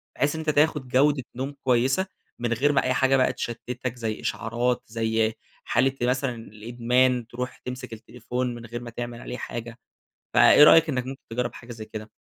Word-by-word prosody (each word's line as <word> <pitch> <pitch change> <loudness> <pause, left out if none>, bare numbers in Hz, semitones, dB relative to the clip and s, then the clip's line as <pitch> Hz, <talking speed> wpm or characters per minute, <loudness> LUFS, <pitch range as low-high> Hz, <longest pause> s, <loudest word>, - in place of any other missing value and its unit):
بحيث 145 +3 +1
إن - - -4
أنت 155 - -2
تاخد 150 -2 +2
جودة 135 +2 +3
نوم 135 +3 -4
كويسة، 130 +8 +2 0.3
من 120 0 0
غير 140 +5 +2
ما 140 - +2
أي 130 - +1
حاجة 135 +1 +3
بقى 130 - +2
تشتتك، 120 +1 -5
زي 110 -3 -4
إشعارات، 120 +2 -1
زي 110 0 0 0.3
حالة 130 +3 +2
مثلًا 125 +1 0
الإدمان، 120 +2 0
ترُوح 125 +2 -5
تمسك 125 -2 -7
التليفون 125 +2 -4
من 120 -1 -9
غير 120 +1 -6
ما 120 - -7
تعمل 120 0 -6
عليه 125 - -6
حاجة. 120 -1 -6 0.6
فإيه - - +8
رأيك 165 +1 +7
إنك 125 -4 -1
ممكن 135 +1 -7
تجرَّب 120 +1 -2
حاجة 120 0 -11
زي 110 -2 -8
كده؟ 110 0 -8
125 Hz, 180 wpm, -25 LUFS, 115-130 Hz, 0.6 s, فإيه